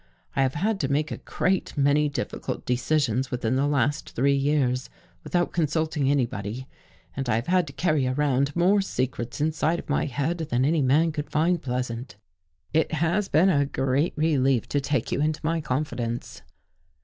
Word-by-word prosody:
I 135 - +2
have 130 -1 +1
had 200 +6 0
to 135 -1 -1
make 150 +2 0
a - - -3
great 190 -4 -1
many 145 +1 +3
difficult 140 - -4
decisions 130 -1 0
within 125 0 -1
the 135 +2 +2
last 145 +1 0
three 140 +3 +3
years 135 -2 +1 0.3
without 175 -1 0
consulting 155 -3 0
anybody, 120 -3 -1 0.5
and 135 -2 -3
I 110 - +3
have 115 +2 -1
had 180 0 +2
to 140 - -9
carry 155 -6 +1
around 140 +1 +1
more 190 +4 +4
secrets 125 - -3
inside 155 +2 +1
of - - -9
my - - +1
head 145 +6 -2
than 125 +2 +2
any 155 +1 +2
man 150 +5 +3
could 150 -1 -5
find 165 +3 +1
pleasant. 125 -1 -4 0.6
It 160 +1 +1
has 170 +6 +1
been 165 +6 +4
a 140 -5 +2
great 135 +4 0
relief 135 -6 +2
to 145 - 0
take 140 -4 -1
you - - 0
into 155 0 0
my 165 +1 0
confidence." 125 -4 -3
145 Hz, 175 wpm, -25 LUFS, 130-155 Hz, 0.6 s, more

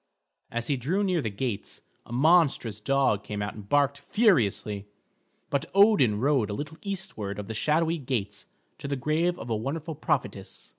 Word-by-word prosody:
As 120 0 -3
he 140 - 0
drew 170 - 0
near 180 -4 +1
the 110 - -2
gates, 105 +1 -4 0.3
a - - -12
monstrous 140 - +3
dog 135 -4 +1
came 105 -1 -5
out 100 - -4
and 100 -2 -11
barked 145 0 +2
furiously, 120 - +1 0.6
but 140 - 0
Odin 200 - +5
rode 130 -4 +2
a - - -2
little 150 +4 -6
eastward 175 - -4
of 105 - -5
the 110 - -5
shadowy 160 +7 +1
gates 110 -7 -3 0.3
to - - -6
the 140 - -1
grave 160 +6 0
of 115 - -7
a - - +2
wonderful 150 +8 -3
prophetess. 145 - -3
135 Hz, 170 wpm, -27 LUFS, 110-160 Hz, 0.6 s, Odin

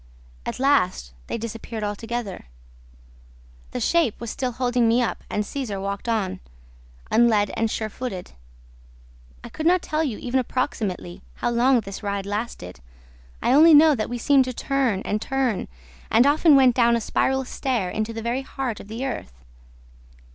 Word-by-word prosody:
At - - -3
last, 185 - +1
they - - -3
disappeared 225 0 -6
altogether. 215 0 -4 1.2
The - - -4
shape 335 -10 +1
was 235 -1 -5
still 255 -2 -3
holding 245 -1 +1
me 230 +2 +3
up 240 - -1
and 210 - -1
Cesar 225 -6 -4
walked 200 +3 -4
on, 210 -5 -1 0.7
unled 220 -3 +4
and 225 0 0
sure 220 0 -2
footed. 210 -5 -6 1.1
I - - -8
could 315 - -2
not 360 0 +3
tell 310 +1 -1
you, 255 -9 -2
even 255 +1 -1
approximately, 205 -8 -3
how 240 - -1
long 245 +1 +3
this 195 -2 -8
ride 200 -1 -3
lasted; 205 - -5 0.6
I - - +3
only 310 +3 +8
know 310 +1 +7
that 220 -5 -2
we 245 - -3
seemed 270 +2 +4
to 255 - -4
turn 255 -7 0
and 210 0 -2
turn 265 -6 -1 0.4
and 230 +3 +5
often 300 +1 +5
went 260 -3 +5
down 235 -1 +4
a - - +1
spiral 265 +4 0
stair 240 -8 -2
into 215 +1 -2
the 225 0 -6
very 240 +3 -1
heart 265 -4 -4
of - - -11
the 230 +5 -4
earth. 65 - -5
235 Hz, 165 wpm, -23 LUFS, 210-265 Hz, 1.2 s, only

